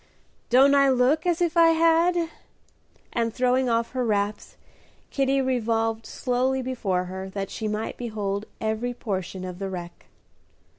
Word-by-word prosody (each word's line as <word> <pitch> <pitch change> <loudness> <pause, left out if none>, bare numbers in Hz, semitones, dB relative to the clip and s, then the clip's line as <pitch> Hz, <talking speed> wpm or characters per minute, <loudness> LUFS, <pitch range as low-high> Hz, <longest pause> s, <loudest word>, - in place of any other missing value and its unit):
"Don't 270 +3 +6
I 275 -1 +5
look 265 +6 +2
as 345 -1 +1
if 345 -1 +1
I 335 -1 +7
had?" 335 +1 +3 0.8
and, 230 -1 0
throwing 250 +2 +1
off 230 0 0
her 255 -1 -1
wraps, 205 -2 -2 0.5
Kitty 275 0 +1
revolved 225 -3 0
slowly 260 +1 -1
before 205 -8 -1
her 190 +1 -6
that 195 0 -5
she 220 - -4
might 215 +1 -3
behold 210 -3 -3
every 220 +3 -2
portion 190 -4 -4
of 180 -1 -7
the 195 -1 -3
wreck. 175 -2 -8
235 Hz, 145 wpm, -25 LUFS, 205-265 Hz, 0.8 s, I